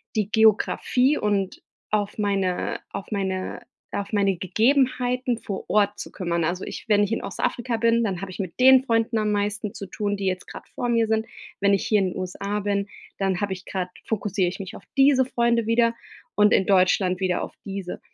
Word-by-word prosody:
die 210 -2 0
Geographie 235 +5 +3
und 200 -2 -1 0.3
auf 205 -1 -1
meine 195 -3 -1
auf 200 - -6
meine 190 -2 -3 0.3
auf 200 +1 -4
meine 195 -3 +2
Gegebenheiten 250 +4 +1
vor 195 -2 -5
Ort 205 -1 +2
zu - - -7
kümmern. 170 -3 -2
Also, 175 +3 -1
ich - - -7
wenn 205 -1 +5
ich 205 - -1
in 225 - -1
Ostafrika 240 -1 -2
bin, 230 0 +3
dann 190 -4 -2
habe 195 - -5
ich - - -9
mit 185 +4 -5
den 260 0 +7
Freunden 230 -1 +1
am 215 -1 +1
meisten 205 0 -1
zu 200 - -7
tun, 205 +2 -2
die 195 - -4
jetzt 185 -1 -2
grad - - -10
vor 245 - -2
mir 230 -1 +2
sind. 220 0 +1 0.3
Wenn 200 0 +3
ich 195 - +1
hier 215 - +3
in 185 -2 -1
USA 200 +3 -3
bin, 200 0 -1 0.3
dann 195 -1 0
habe 200 -2 -1
ich 185 0 -10
grad 185 -2 -3 0.2
fokussiere 205 -3 0
ich 185 - -8
mich 195 +2 -7
auf - - -11
diese 270 -1 +5
Freunde 235 -2 +1
wieder 230 0 +3 0.4
und 210 0 +5
in 190 - +3
Deutschland 185 -1 +3
wieder 185 -2 0
auf - - -8
diese. 195 -2 -5
205 Hz, 200 wpm, -24 LUFS, 190-230 Hz, 0.4 s, den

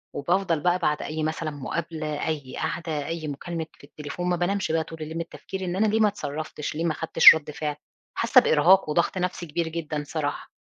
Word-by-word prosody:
وبافضل 175 +1 +1
بقى 180 +3 +2
بعد 150 -3 0
أي 155 +1 -3
مثلًا 155 0 -2
مقابلة، 155 +1 -4
أي 145 -5 -4
قعدة، 160 -2 -3
أي 165 -2 -4
مكالمة 160 +3 -4
في - - -22
التليفون، 150 +5 -5
ما 180 - +2
بانامِش 175 0 -1
بقى 160 0 +1
طول 160 0 -10
الليل 155 +1 -6
من 165 - -1
التفكير، 190 +3 -7
إن 180 0 -2
أنا 215 +2 +2
ليه 220 +2 +1
ما 215 - +5
اتصرَّفتِش، 155 -5 -4
ليه 165 - -1
ما 165 - +2
أخدتِش 165 0 +7
رد 150 -1 -5
فعل؟ 150 -1 -3 0.4
حاسَّة - - +6
بإرهاق 165 +3 +4
وضغط 170 +4 +1
نفسي 180 -1 -2
كبير 165 +1 -2
جدًا 155 -2 -4
صراحة. 145 -3 -3
160 Hz, 205 wpm, -25 LUFS, 150-175 Hz, 0.4 s, أخدتِش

